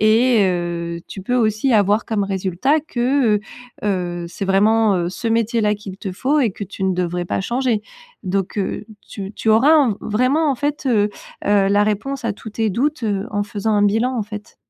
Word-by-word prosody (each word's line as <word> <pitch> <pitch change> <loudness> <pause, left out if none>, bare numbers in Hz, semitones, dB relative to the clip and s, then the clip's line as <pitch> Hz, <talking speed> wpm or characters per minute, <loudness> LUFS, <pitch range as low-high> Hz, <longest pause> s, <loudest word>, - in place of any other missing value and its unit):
et 225 +1 +4
heu, 170 -2 -2
tu 195 - -7
peux 245 +6 -1
aussi 225 +2 +2
avoir 205 +1 +3
comme 210 -3 0
résultat 195 - 0
que, 250 -5 +1
heu - - -14 0.4
heu, 175 -4 -1
c'est 190 - -5
vraiment, 210 +2 +3
heu, 175 -1 -1
ce 230 +5 -4
métier-là 225 -1 +1
qu'il 195 -2 -9
te 195 -2 -5
faut 280 +10 +1
et 240 -5 +2
que 205 - -6
tu 195 0 -8
ne 190 -1 +1
devrais 175 0 -2
pas - - -1
changer. 240 -2 0 0.4
Donc 195 +1 -2
heu, 200 - -2 0.2
tu 195 -1 -7
tu 220 - -3
auras 240 +8 +5
un 285 -6 +4
v 200 - -3
vraiment, 260 +8 +1
en - - +1
fait, 290 +2 -2
heu 210 -4 +2 0.4
heu, 200 -1 +3
la 205 +1 +4
réponse 230 +5 -2
à 225 - 0
tous 220 - -10
tes 220 0 0
doutes, 270 +7 -1
heu, 205 -1 -1
en 205 -1 0
faisant 210 0 -2
un 205 - +3
bilan, 225 +5 +1
en 225 - 0
fait. 210 0 -9
210 Hz, 210 wpm, -20 LUFS, 195-240 Hz, 0.4 s, auras